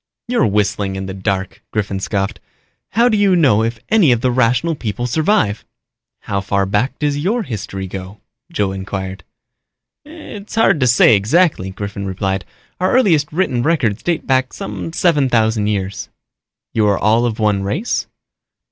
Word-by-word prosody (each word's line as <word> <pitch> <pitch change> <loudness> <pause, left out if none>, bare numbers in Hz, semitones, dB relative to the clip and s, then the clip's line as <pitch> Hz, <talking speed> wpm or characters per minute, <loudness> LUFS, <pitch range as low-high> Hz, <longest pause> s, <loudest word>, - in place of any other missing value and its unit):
"You're 245 - +2
whistling 100 -1 0
in 95 0 -4
the 95 - -5
dark," 95 0 -3
Griffin 100 -2 -2
scoffed. 100 0 -2 0.5
"How 235 +2 +4
do 230 - +2
you 200 -3 +3
know 135 -11 +4
if 115 +1 -1
any 210 -11 +5
of 120 -2 +2
the 125 - +2
Rational 125 +6 +2
People 120 -4 -4
survive?" 155 - +1 0.6
"How 100 -1 -2
far 100 0 0
back 110 +7 0
does 145 -1 -1
your 215 +9 0
history 100 - -5
go?" 95 +2 -8 0.3
Joe 100 - 0
inquired. 95 0 -5 0.8
"It's 290 -11 -10
hard 225 -8 +3
to 130 - +3
say 120 -2 +6
exactly," 110 - +2
Griffin 100 +1 -5
replied. 95 +1 -2 0.3
"Our 185 +1 +1
earliest 170 - +3
written 155 -8 0
records 125 -8 +1
date 175 -2 -1
back 130 -1 +1
some 95 -5 -6
seven 150 - +2
thousand 110 -3 +2
years." 100 -2 -3 0.6
"You 110 -2 +2
are 100 - +2
all 115 +3 +2
of 115 -2 -3
one 105 -3 +1
race?" 150 - -2
110 Hz, 160 wpm, -18 LUFS, 100-155 Hz, 0.8 s, say